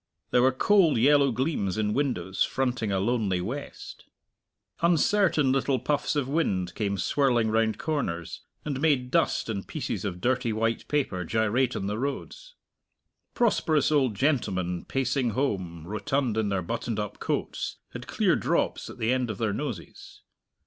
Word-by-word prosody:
There 125 - +4
were 130 +1 +5
cold 170 - +4
yellow 140 +3 +5
gleams 115 - -1
in 105 -1 0
windows 100 -10 -2
fronting 125 -5 -1
a 95 - +1
lonely 105 -3 0
west. 125 +11 -7 0.8
Uncertain 170 -3 +3
little 135 0 +1
puffs 145 +3 -1
of 145 -3 0
wind 95 - 0
came 100 -1 -1
swirling 120 +1 +2
round 110 -1 +1
corners, 100 - -3 0.2
and 140 -3 -3
made 135 -5 +2
dust - - +1
and 100 -4 -4
pieces - - -4
of 90 -4 -4
dirty 125 +1 +1
white 115 +1 -1
paper 130 -11 -1
gyrate 110 +7 +1
on 95 - -3
the 105 +2 -2
roads. 140 - -5 0.8
Prosperous 160 - +2
old 135 -7 +2
gentlemen 95 - 0
pacing 130 -2 0
home, 90 - -2
rotund 125 +4 -1
in 110 -2 0
their 95 -2 -1
buttoned - - -3
up - - -4
coats, - - -3
had - - -8
clear - - +2
drops - - 0
at - - -10
the 115 +3 +1
end 130 -2 0
of 110 - -4
their 110 -3 0
noses. 120 - -7
120 Hz, 155 wpm, -27 LUFS, 100-140 Hz, 0.8 s, were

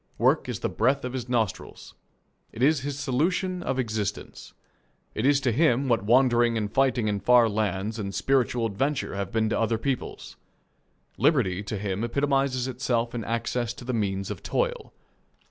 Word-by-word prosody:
Work - - +2
is - - -4
the - - 0
breath 130 +4 +1
of 125 - -5
his 125 -2 -5
nostrils. 115 -6 -3 0.6
It 115 - -4
is 150 +1 +4
his 140 +1 -4
solution 175 +7 0
of 135 - -2
existence. 110 -5 -4 0.6
It 115 - 0
is 140 -1 +4
to 130 -2 +1
him 135 0 +2
what 115 -4 +1
wandering 120 0 +4
and 105 -1 -3
fighting 125 -4 +2
in 105 -1 0
far 120 +1 +5
lands 105 0 -2
and 100 -2 -3
spiritual 125 -3 +1
adventure 135 +7 -1
have 100 0 -4
been 110 -1 +1
to - - 0
other 115 0 +1
peoples. 130 +2 -4 0.8
Liberty 115 - +2
to 105 +1 -4
him 100 +1 -3
epitomizes 135 0 0
itself 120 -2 -1
in 120 -2 -3
access 115 +1 -2
to 120 - -11
the 130 - -2
means 100 -3 -1
of - - -6
toil. - - -2
120 Hz, 170 wpm, -26 LUFS, 110-135 Hz, 0.8 s, far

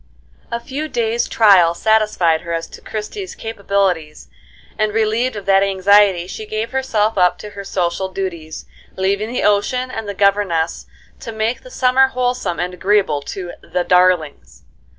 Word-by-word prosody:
A 235 - -3
few 285 +5 -5
days' 235 -3 -1
trial 190 -6 +5
satisfied 210 -6 +2
her 170 -1 -5
as 165 0 -2
to - - -12
Christie's 225 - -6
capabilities, 195 -8 -2 0.5
and, 215 -1 -1
relieved 225 +3 +1
of 205 -2 -7
that 195 0 +4
anxiety, 195 -1 +3
she 215 +3 -8
gave 215 +2 -3
herself 225 -6 0
up 180 -1 +3
to 210 - -9
her 200 -1 -8
social 185 0 -2
duties, 170 -5 -6 0.3
leaving 200 +4 -1
the 250 - -2
ocean 230 +5 +1
and 225 -3 -5
the 200 - -5
governess 195 -5 +1 0.3
to 230 - -7
make 220 +2 -2
the - - -13
summer 265 - +3
wholesome 250 -7 -2
and 180 +1 -2
agreeable 190 -5 +1
to 175 +4 -6
"the 180 - -2
darlings." 180 -4 +1
205 Hz, 155 wpm, -18 LUFS, 180-225 Hz, 0.5 s, trial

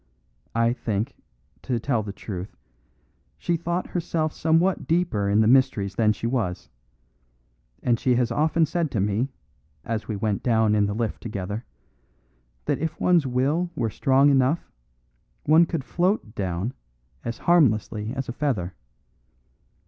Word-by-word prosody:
I 115 +1 +3
think, 115 0 -2 0.5
to 125 -3 -1
tell 120 -1 0
the 105 -1 -5
truth, 95 -1 -7 0.8
she 175 - 0
thought 175 +2 -2
herself 160 -3 -1
somewhat 165 +4 +1
deeper 160 - +1
in 105 +2 +4
the 110 - +3
mysteries 110 -6 +3
than 105 +2 +3
she 110 - -4
was; 100 - -2 1.1
and 120 -2 +2
she 125 -2 +2
has 120 -1 +1
often 155 +5 +2
said 165 +1 -1
to 110 - -2
me, 105 +6 0 0.6
as 110 -1 -3
we 110 - -2
went 100 0 -1
down 110 -3 +3
in 105 -1 +3
the 100 - -3
lift 115 -1 -2
together, 105 0 -4 1.0
that - - 0
if 160 0 -3
one's 170 -6 +3
will 140 +8 +1
were 115 -2 -1
strong 135 +4 +4
enough, 135 +4 +2 0.7
one 160 +3 +5
could 160 -5 -2
float 180 - 0
down 95 +3 -2 0.5
as 115 -1 -4
harmlessly 110 -9 +2
as 135 -1 -3
a 120 - -4
feather. 120 -11 -1
120 Hz, 145 wpm, -25 LUFS, 105-155 Hz, 1.1 s, one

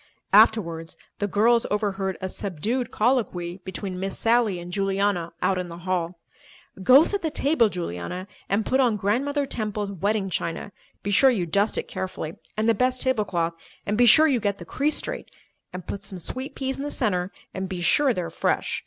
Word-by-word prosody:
Afterwards, 165 -7 +4 0.2
the 205 - 0
girls 230 +4 +3
overheard 195 -2 -1
a 190 - -2
subdued 210 +7 -2
colloquy 210 -8 0
between 190 0 -5
Miss 195 +1 -3
Sally 230 -4 +2
and 175 0 -8
Juliana 195 -3 0
out 190 -1 +2
in 180 -1 -4
the 170 - -8
hall. 175 -1 -2 0.6
"Go 255 +9 +8
set 405 +3 -1
the 320 - 0
table, 280 -6 +2
Juliana, 180 - -5 0.2
and 200 +2 +1
put 260 - +1
on 240 -5 +3
Grandmother 275 +9 0
Temple's 210 -5 -3
wedding 200 +1 -1
china—be 195 +4 -5
sure 265 +7 +6
you 205 -9 +1
dust 200 +6 +1
it - - -2
carefully—and 185 +4 -4
the 230 - +5
best 255 +3 +1
tablecloth—and 200 -5 -2
be 245 +2 +5
sure 310 +7 +8
you 265 -5 +2
get 200 -2 -1
the 175 - -10
crease 290 - 0
straight—and 185 - -8
put 200 - -5
some 195 -1 -7
sweet 260 - -6
peas 265 -1 -2
in 275 - -4
the 290 - -3
centre—and 190 -4 -3
be 185 -2 -4
sure 275 - +3
they 185 - -1
are 165 - -6
fresh. - - 0
200 Hz, 175 wpm, -25 LUFS, 180-240 Hz, 0.6 s, Go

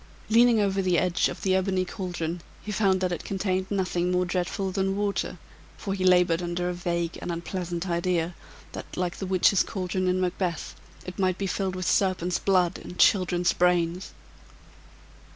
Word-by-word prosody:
Leaning 235 0 +6
over 195 -1 +1
the 180 -2 +2
edge 180 0 +2
of - - -8
the 190 - +2
ebony 190 0 +1
caldron, 175 -3 -4 0.2
he 210 - -5
found 190 -2 +2
that 185 -1 0
it 175 - -3
contained 190 -1 -2
nothing 180 -3 0
more 180 0 +1
dreadful 185 +2 -2
than 195 0 0
water, 205 -1 -1 0.4
for 195 - -3
he 190 -1 -2
labored 180 -2 +4
under 175 0 -2
a - - -2
vague 170 -1 -2
and 175 - -3
unpleasant 175 +1 -4
idea 175 0 0 0.4
that, - - -8
like 180 0 -2
the 190 - -4
witches' 190 +1 +4
caldron 185 -1 -2
in 180 0 +1
Macbeth, 180 -2 -2 0.3
it 180 +1 -8
might 185 -1 +1
be 200 - -2
filled 190 0 -2
with 185 -1 -4
serpents' 180 -2 +1
blood 185 -3 +2
and 180 - -10
childrens' 180 -3 +3
brains. 180 0 +1
185 Hz, 170 wpm, -26 LUFS, 175-190 Hz, 0.4 s, Leaning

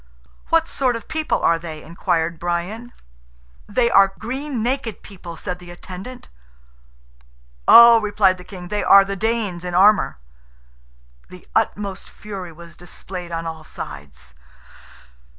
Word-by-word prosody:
"What 330 -1 +3
sort 255 -6 0
of 230 - -8
people 315 0 -1
are 165 0 +3
they?" 160 -2 -8
inquired 170 -1 -2
Brian. 180 +8 -3 0.8
"They 235 +3 +2
are 195 0 +5
green 260 +1 -4
naked 245 -3 -2
people." 175 -4 -10
said 180 +2 -5
the 175 -1 -13
attendant. 185 +7 -10 1.4
"Oh!" 235 -1 +9
replied 200 -3 +2
the - - -10
king, 180 -2 -10
"they 210 +1 -1
are 195 0 +7
the 195 0 -4
Danes 210 -4 -2
in 180 -1 -4
armour!" 200 - +4 1.1
The 180 -1 -14
utmost 200 -3 -1
fury 195 -4 -8
was 170 +1 -14
displayed 175 0 -9
on 165 0 -4
all 160 -1 -6
sides. 70 - -10
190 Hz, 135 wpm, -21 LUFS, 175-225 Hz, 1.4 s, Oh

